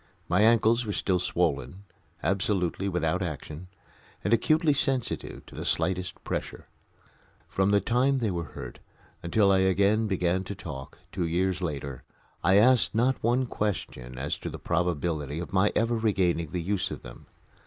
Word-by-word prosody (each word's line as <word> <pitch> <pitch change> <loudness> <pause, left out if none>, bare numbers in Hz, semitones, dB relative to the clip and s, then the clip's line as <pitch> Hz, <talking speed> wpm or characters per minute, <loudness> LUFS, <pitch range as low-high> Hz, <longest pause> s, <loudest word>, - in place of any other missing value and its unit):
My 90 +4 +2
ankles 115 +1 +4
were 105 -3 -3
still 95 -2 +1
swollen, 90 +2 -1 0.4
absolutely 95 -1 0
without 90 0 0
action, 80 0 -5 0.6
and 105 - +1
acutely 155 +5 +3
sensitive 135 -3 -1
to - - -15
the - - -6
slightest 90 0 -1
pressure. - - -4 0.8
From 95 0 +1
the 100 0 +4
time 125 +6 +2
they 115 -5 0
were 85 -2 -4
hurt - - -8 0.4
until 100 +3 +3
I 95 - +4
again 100 +4 +3
began 95 -1 0
to 100 - -5
talk 65 -5 -8
two 90 -3 -1
years 90 +2 0
later 70 -6 -4 0.4
I 95 - +4
asked 120 +2 +4
not 125 +3 +2
one 120 +3 +2
question 65 - -4
as 70 +3 -3
to - - -5
the - - -7
probability 85 -4 -1
of 85 +2 -6
my 100 +2 +3
ever 115 +2 +2
regaining 95 -7 +1
the 90 +1 -3
use 100 +1 -1
of - - -7
them. - - -12
95 Hz, 160 wpm, -27 LUFS, 85-110 Hz, 0.8 s, ankles